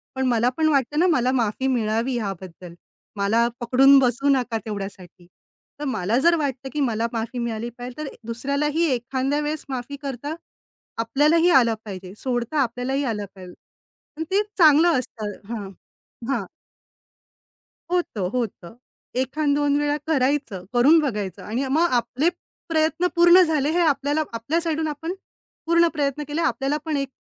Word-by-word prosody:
पण 265 0 -1
मला 240 0 +2
पण 320 -1 +2
वाटतं 285 0 +1
ना, 360 - +4
मला 255 -7 +2
माफी 245 0 0
मिळावी 230 0 0
याबद्दल. 185 -5 -6 0.4
मला 220 +4 +2
पकडून 265 +3 +6
बसू 255 +2 +1
नका 250 -4 +1
तेवढ्यासाठी. 195 -4 -7 0.5
तर 295 - -4
मला 225 -4 0
जर 340 0 +5
वाटतं 270 -2 -3
की 300 - -2
मला 230 -3 0
माफी 230 +2 -3
मिळाली 235 0 -3
पाहिजे 245 0 -8
तर 305 - -4
ए - - -15
दुसऱ्यालाही 280 +7 0
एखाद्या 260 +4 -1
वेळेस 300 0 -3
माफी 260 +1 -4
करता 280 +1 -5 0.6
आपल्यालाही 300 +9 +3
आलं 245 -9 +5
पाहिजे. 185 -2 -8
सोडता 250 +4 -2
आपल्यालाही 255 +3 -1
आलं 215 -6 -2
पाहिजे 185 -2 -11 0.6
आणि 320 - -3
ते 395 +2 +4 0.2
चांगलं 320 -2 +6
असतं 220 -4 -5 0.2
हां, 205 -4 -5 0.6
हां. 240 -8 -1 1.5
होतं, 285 - -1
होतं. 225 -7 -4 0.5
एखाद 285 +3 0
दोन 290 0 +2
वेळा 295 0 +1
करायचं, 270 - 0
करून 265 +7 +6
बघायचं 210 - -3
आणि 245 +6 -2
मग 325 +5 +3
आपले 255 +7 -1 0.4
प्रयत्न 325 +2 +1
पूर्ण 345 +2 +7
झाले 305 -4 +1
हे 350 - +1
आपल्याला 290 -1 +1
आपल्या 230 +9 -1
साईडून 320 -1 -1
आपण 325 +4 -4 0.5
पूर्ण 335 +1 +4
प्रयत्न 290 -1 -1
केले. 295 +3 -2
आपल्याला 285 -3 0
पण 315 -2 -1
एक 275 -1 -2
265 Hz, 150 wpm, -23 LUFS, 230-300 Hz, 1.5 s, पूर्ण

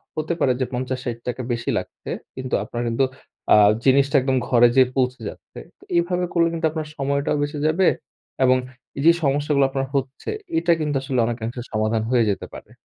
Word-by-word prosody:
হতে 155 +2 -1
পারে 130 - +3
যে 130 - +1
৫০ 130 +1 -2
৬০ 120 -1 -3
টাকা 125 +1 -3
বেশি 115 0 -3
লাগছে। - - -7 0.3
কিন্তু 130 -1 -6
আপনার 120 +2 -5
কিন্তু 115 +4 +1 0.5
আ - - +9 0.3
জিনিসটা 140 +2 +4
একদম 130 0 +1
ঘরে 120 -2 +6
যেয়ে 130 -1 +5
পৌঁছে 125 -1 0
যাচ্ছে। - - -12 0.2
তো - - -19
এভাবে 180 +1 +1
করলে 170 -1 +3
কিন্তু 165 -1 -2
আপনার 155 -1 -4
সময়টাও 140 +1 0
বেঁচে 145 +1 -2
যাবে 175 +4 +3 0.6
এবং 130 0 +5 0.4
এই 140 - -2
যে 170 - +9
সমস্যাগুলো 140 0 +2
আপনার 135 0 -2
হচ্ছে, 135 - -3 0.3
এটা 250 - +2
কিন্তু 150 -2 -1
আসলে 135 -2 -1
অনেকাংশে 120 +1 -4
সমাধান 110 +1 0
হয়ে 125 -2 +3
যেতে - - -4
পারে। - - -11
135 Hz, 185 wpm, -22 LUFS, 125-145 Hz, 0.6 s, আ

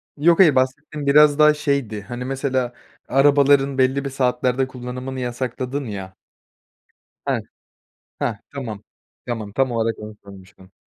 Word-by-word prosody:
Yok, 165 +4 +3
hayır. 160 -8 +6
Bahsettiğim 145 +3 -1
biraz 150 +1 +6
daha 150 0 +7
şeydi, 140 -8 -2
hani, 120 +4 -6
mesela, 130 -2 -1 0.3
arabaların 140 0 +4
belli 135 +1 +2
bir - - -2
saatlerde 130 0 0
kullanımını 125 +1 -6
yasakladın 125 +2 -3
ya 95 -4 -7 1.1
Heh, - - 0 0.8
heh. 120 - 0 0.2
Tamam, 125 -7 -5 0.5
tamam. 110 -4 -4
Tam 135 +3 +1
olarak 115 -1 -1
onu 105 0 -9
sormuştum. 95 -1 -15
130 Hz, 125 wpm, -21 LUFS, 120-140 Hz, 1.1 s, daha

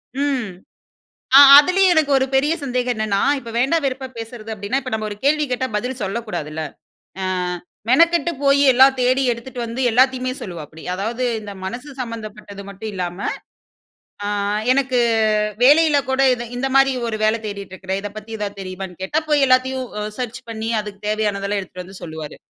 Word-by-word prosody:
ம், 270 -6 -1 0.9
அ - - +12 0.2
அதிலயும் 365 +4 +4
எனக்கு 310 -3 +2
ஒரு 265 - 0
பெரிய 290 +4 +3
சந்தேகம் 250 -2 -1
என்னன்னா, 215 -2 0 0.2
இப்போ 235 -3 -9
வேண்டா 270 +7 +2
வெறுப்பா 265 0 -2
பேசுறது 225 -1 -8
அப்டின்னா, 210 +7 -2
இப்ப 255 - -7
நம்ப 215 -1 -2
ஒரு 205 - -6
கேள்வி 300 +1 +3
கேட்டா 255 +1 -1
பதில் 250 +3 -3
சொல்லக்கூடாது 195 -6 -4
இல்ல. 160 0 -4 0.6
ஆ, - - -1 0.6
மெனக்கெட்டு 335 +6 +4
போயி 280 0 +4
எல்லாம் 265 +2 +6
தேடி 255 +2 +2
எடுத்துட்டு 245 +2 -7
வந்து 230 +3 -5
எல்லாத்தையுமே 255 +1 +2
சொல்லுவாப்டி. 160 -4 -8
அதாவது, 230 +6 -3 0.2
இந்த 205 -1 -8
மனசு 245 +9 -6
சம்பந்தப்பட்டது 215 -4 -7
மட்டும் 200 +2 -7
இல்லாம, 180 0 -4 1.1
அ - - -2 0.5
எனக்கு 260 -1 +1 0.7
வேலையில 300 +1 +6
கூட 265 +1 +2
இது 240 -1 -6
இந்த 270 +2 -1
மாரி 270 0 +5 0.2
ஒரு 220 - -2
வேல 215 +1 +3
தேடிட்ருக்கிறேன், 190 -1 -5
இதை 205 - -5
பத்தி 215 +1 -9
ஏதாவது 205 -1 -5
தெரியுமான்னு 185 -1 -8
கேட்டா, 300 +12 0
போய் 290 -2 +4
எல்லாத்தையும் 255 0 +2
அ - - -3 0.2
சர்ச் 245 +1 -4
பண்ணி 225 0 -4
அதுக்கு 205 -1 -10
தேவையானதெல்லாம் 205 -1 -1
எடுத்துட்டு 185 -1 -9
வந்து 190 +1 -12
சொல்லுவாரு. 160 -2 -8
235 Hz, 165 wpm, -20 LUFS, 200-265 Hz, 1.1 s, அ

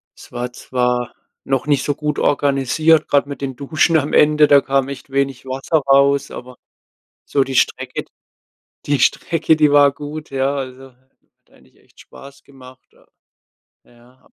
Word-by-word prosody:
es - - -16
war 120 0 -4
zwar 125 -1 -2 0.3
noch 135 0 -1
nicht 145 -2 +1
so 145 - -1
gut 150 -1 -3
organisiert, 145 +3 +1
grad 140 0 +1
mit 140 - -8
den 135 -2 -4
Duschen 155 +5 0
am 145 0 -2
Ende, 150 0 +4
da 140 -1 +7
kam 135 0 -1
echt 140 0 -9
wenig 135 -1 -2
Wasser 135 +5 -1
raus, 140 0 +3
aber, 125 0 -10 0.7
so 140 -2 +1
die 135 0 -6
Strecke 125 - -1 0.8
die 145 -1 +1
Strecke, 160 -1 +1
die 150 -2 +3
war 145 -1 +5
gut, 150 +1 -9
ja, 135 +1 -1
also, 135 0 -7
hat 130 +2 -40
eigentlich 65 0 -25
echt - - -22
Spaß 140 0 -15
gemacht, 130 -2 -17
ja. - - -27 0.8
Ja, 120 +1 -23
ab - - -28
140 Hz, 165 wpm, -18 LUFS, 130-145 Hz, 0.8 s, da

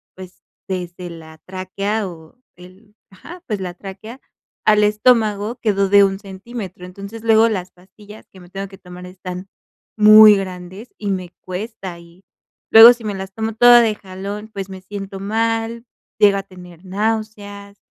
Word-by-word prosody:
pues, 185 -1 -13 0.3
desde 180 -1 -5
la 160 -1 -12
tráquea, 195 +3 -3
o 165 +6 -13 0.2
el 185 +4 -18 0.2
ajá, 345 - -13
pues, 210 -4 -3
la 180 -2 -5
tráquea 200 +6 -10 0.5
al 210 0 +4
estómago 215 0 +2
quedó 200 -3 +1
de 200 0 +6
1 195 0 +1
centímetro. 195 -1 -9
Entonces, 200 +4 -10
luego 225 0 +4
las 185 -4 -4
pastillas 205 +4 -16
que 190 - -16
me 175 -1 -16
tengo 195 +1 -6
que 195 0 -14
tomar 180 0 -11
están 180 0 -8 0.5
muy 215 0 +8
grandes 185 +4 -7
y 205 -2 -3
me 185 -2 -4
cuesta. 185 -2 -7
Y 170 +2 -19 0.5
luego, 230 +2 +10
si 235 - -14
me 210 -1 -3
las 190 0 -7
tomo 220 +1 -3
toda 240 +2 +7
de 220 -2 +1
jalón, 200 +3 -8
pues, 195 -1 -6
me 190 -1 -9
siento 195 0 -8
mal, 225 +3 -2 0.3
llego 200 -1 +5
a 195 - -4
tener 180 -2 -15
náuseas, 205 0 -4
200 Hz, 160 wpm, -19 LUFS, 185-215 Hz, 0.5 s, luego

